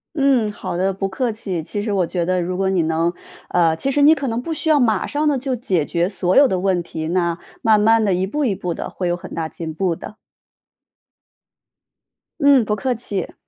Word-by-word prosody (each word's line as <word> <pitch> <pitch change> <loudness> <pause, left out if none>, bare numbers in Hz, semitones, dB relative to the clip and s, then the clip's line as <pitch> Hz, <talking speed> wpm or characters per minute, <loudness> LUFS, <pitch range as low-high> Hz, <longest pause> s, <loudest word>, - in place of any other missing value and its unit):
嗯， 270 -7 +2
好 205 - -5
的， 190 +2 +1
不 195 +1 -2
客 235 +5 -2
气。 190 -6 -4
其 205 +5 -4
实 210 -1 -2
我 185 -3 +2
觉 175 0 -2
得 185 0 +1
如 180 +1 -3
果 190 0 +1
你 185 -3 +2
能 165 +2 0 0.3
呃， 165 -2 +2
其 270 - -2
实 285 +2 +1
你 295 +2 +7
可 280 -3 -3
能 230 0 -2
不 325 +6 -4
需 320 +1 -2
要 305 - +5
马 225 -7 +2
上 295 +1 -1
地 290 -3 +2
就 260 0 -2
解 185 - 0
决 175 +2 0
所 185 -2 0
有 285 - +7
的 185 - 0
问 185 -2 0
题， 160 -1 -5
那 170 -1 0 0.2
慢 220 -4 +4
慢 225 +1 +4
地 200 -3 +2
一 185 +1 0
步 295 +8 -2
一 230 - +1
步 180 -2 -3
的， - - -5
会 180 - -4
有 175 - +1
很 175 - -10
大 160 -1 -2
进 160 -1 -7
步 175 0 0
的。 210 - -10 2.2
嗯， 280 -4 +5
不 210 - 0
客 245 +4 -1
气。 200 -5 -4
195 Hz, 245 characters per minute, -20 LUFS, 175-245 Hz, 2.2 s, 你